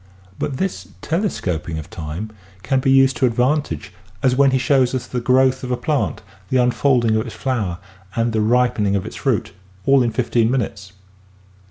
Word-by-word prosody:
But 135 - -2
this 175 - -3 0.2
telescoping 90 - -2
of 80 - -8
time 85 +6 -6 0.3
can 135 -2 +1
be 130 - 0
used 135 0 +5
to 130 - +3
advantage 125 -3 -1 0.3
as 130 -1 +3
when 140 +1 +5
he 130 - +2
shows 130 0 +2
us 130 - -3
the 125 - -4
growth 130 +2 +3
of 125 - -4
a 125 - 0
plant, 135 -7 -1 0.3
the 130 - +2
unfolding 125 -2 +2
of 110 +3 -2
its 115 - -8
flower 110 -10 -2 0.4
and 115 0 0
the 110 - +1
ripening 110 -3 +2
of 100 0 -1
its 110 - -7
fruit, 125 -8 -1 0.3
all 135 -1 +5
in 120 - +2
fifteen 115 0 +1
minutes. 100 -6 -3
125 Hz, 180 wpm, -20 LUFS, 110-135 Hz, 0.4 s, used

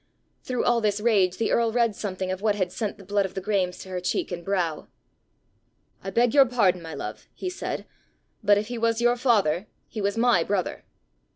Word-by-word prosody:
Through 250 -1 -2
all 240 -1 +3
this 210 -1 +1
rage 205 -5 +2
the 230 - 0
earl 230 -1 +2
read 230 -2 +2
something 185 -2 -3
of 185 +1 -4
what 210 -1 +2
had 185 -3 -1
sent 210 +2 -3
the 200 - -13
blood 200 +1 +1
of 190 -1 -6
the - - -1
Graemes 185 -3 0
to 190 - -12
her 185 -1 -3
cheek 180 - -1
and 175 -1 -5
brow. 175 -5 -1 1.2
"I 195 - -4
beg 235 +5 +2
your 275 -2 +7
pardon, 195 -7 +2
my 160 -2 -7
love," - - -7
he 370 - -4
said, 365 - -4 0.6
"but 205 -1 +5
if 205 - -1
he 240 +1 -5
was 230 0 +1
your 240 0 +3
father, 210 - +2 0.2
he 215 - -6
was 200 +2 -1
my 230 -8 +4
brother!" 195 -1 -2
205 Hz, 210 wpm, -25 LUFS, 185-230 Hz, 1.2 s, your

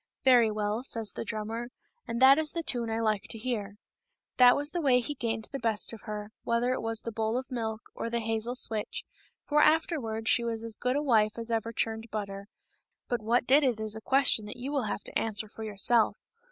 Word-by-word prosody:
" - - -62
Very 245 -4 +6
well, 210 +1 -2
says 230 -4 -2
the - - -4
drummer, 225 +2 -4 0.2
" 475 - -46
and 230 0 -3
that 270 +3 +7
is 310 -1 +1
the 335 - -2
tune 240 -7 0
I 225 0 -1
like 215 -3 0
to - - -2
hear." 215 -4 -3 0.6
That 245 -1 +7
was 290 +1 -2
the 350 - -2
way 260 -4 +4
he 250 +4 -3
gained 225 -4 -3
the 275 - -4
best 225 -1 -1
of 225 - -9
her, 210 0 -5
whether 235 +2 +1
it - - -3
was 225 0 -2
the 230 - -4
bowl 220 +1 -1
of 260 +1 -5
milk 225 -3 -3
or 230 - -4
the 235 0 -1
hazel 225 +2 -2
switch, 220 -4 -2 0.4
for 300 0 +3
afterwards 265 -9 +1
she 235 - +4
was 230 -1 -3
as 230 -1 -3
good 250 +3 -1
a 290 - 0
wife 220 -6 +2
as 230 0 -4
ever 225 0 -1
churned 225 0 -2
butter; 200 -2 -5 0.6
but 240 -2 -1
what 235 +3 +1
did 280 +4 +5
it 245 -5 +1
is 215 0 -1
a 220 - -7
question 265 -4 +3
that 210 - -7
you 255 +3 -5
will 275 -5 0
have 205 - -3
to - - -2
answer 215 -1 +1
for 220 +1 -9
yourself. 215 +2 +3
230 Hz, 235 wpm, -29 LUFS, 220-250 Hz, 0.6 s, that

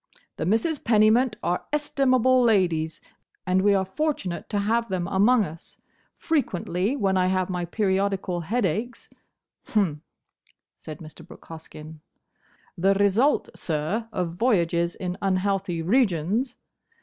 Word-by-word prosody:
"The 160 - -2
Misses 230 - +1
Pennymint 220 +2 +3
are 175 - -1
estimable 260 -4 +2
ladies, 175 -9 +1 0.4
and 185 0 +2
we 200 +1 +4
are 190 -1 +1
fortunate 195 - -3
to 205 - -1
have 230 +3 0
them 180 -2 -2
among 210 +5 +3
us. 165 -3 -10 0.3
Frequently 210 - -1
when 195 -7 +1
I 185 0 +2
have 185 0 0
my 180 -1 -2
periodical 195 -1 -1
headaches—" 215 +5 -2 0.6
"Hum," 185 - 0 0.7
said 155 0 -10
Mr. 155 -1 -12
Brooke - - -15
Hoskyn. 160 -1 -10 0.8
"The 195 +2 +2
result, 205 +8 +2
sir, 175 +9 -3
of 180 -5 -2
voyages 170 -7 +1
in 180 -1 -5
unhealthy 190 -2 -1
regions! 220 - +1
195 Hz, 125 wpm, -25 LUFS, 175-230 Hz, 0.8 s, we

